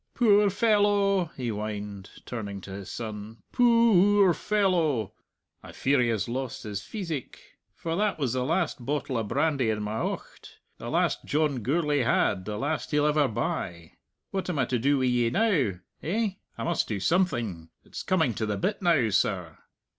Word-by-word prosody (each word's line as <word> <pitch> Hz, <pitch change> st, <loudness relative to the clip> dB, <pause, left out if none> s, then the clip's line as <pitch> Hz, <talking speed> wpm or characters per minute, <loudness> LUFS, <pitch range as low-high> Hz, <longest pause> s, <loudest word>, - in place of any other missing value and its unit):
"Poor 210 Hz, -4 st, +5 dB
fellow!" 205 Hz, -2 st, +3 dB
he 125 Hz, -3 st, -2 dB
whined, 105 Hz, -2 st, -5 dB, 0.2 s
turning 100 Hz, -5 st, -5 dB
to 95 Hz, -, -10 dB
his 95 Hz, 0 st, -7 dB
son; 110 Hz, -1 st, -6 dB
"poo 230 Hz, -5 st, +5 dB
oor 190 Hz, -3 st, +6 dB
fellow! 165 Hz, -, +1 dB, 0.5 s
I -, -, -11 dB
fear 140 Hz, -1 st, +2 dB
he 120 Hz, -, +2 dB
has 115 Hz, -2 st, 0 dB
lost 130 Hz, +1 st, -4 dB
his 105 Hz, -2 st, -4 dB
pheesic. 165 Hz, -, -7 dB, 0.2 s
For 165 Hz, -1 st, -3 dB
that 205 Hz, 0 st, 0 dB
was 135 Hz, -6 st, -1 dB
the 130 Hz, -1 st, 0 dB
last 155 Hz, -2 st, -1 dB
bottle 145 Hz, 0 st, -2 dB
o' 115 Hz, -, +1 dB
brandy 135 Hz, +2 st, +1 dB
in 105 Hz, -1 st, -1 dB
my 105 Hz, +2 st, -3 dB
aucht; -, -, -6 dB, 0.2 s
the -, -, -6 dB
last -, -, +1 dB
John 145 Hz, -4 st, 0 dB
Gourlay 150 Hz, +4 st, +1 dB
had, 105 Hz, -6 st, +1 dB
the 105 Hz, -1 st, -4 dB
last 145 Hz, +7 st, -2 dB
he'll 150 Hz, 0 st, +2 dB
ever 150 Hz, -1 st, +3 dB
buy. 85 Hz, -7 st, -3 dB, 0.4 s
What 190 Hz, -1 st, -3 dB
am 175 Hz, -, -1 dB
I 130 Hz, -, +2 dB
to 125 Hz, -, -1 dB
do 140 Hz, +4 st, +2 dB
wi' 130 Hz, -, +1 dB
ye 120 Hz, -2 st, +2 dB
now?... 175 Hz, -, +2 dB, 0.3 s
Eh?... 215 Hz, +7 st, 0 dB, 0.3 s
I -, -, -4 dB
must 170 Hz, -1 st, 0 dB
do 105 Hz, -3 st, -2 dB
something; 115 Hz, -, 0 dB
it's -, -, -8 dB
coming 160 Hz, -10 st, +1 dB
to 110 Hz, 0 st, -2 dB
the 105 Hz, -1 st, -1 dB
bit 205 Hz, -, -1 dB
now, 160 Hz, -11 st, +3 dB
sir." 90 Hz, -5 st, 0 dB
135 Hz, 175 wpm, -27 LUFS, 110-180 Hz, 0.5 s, oor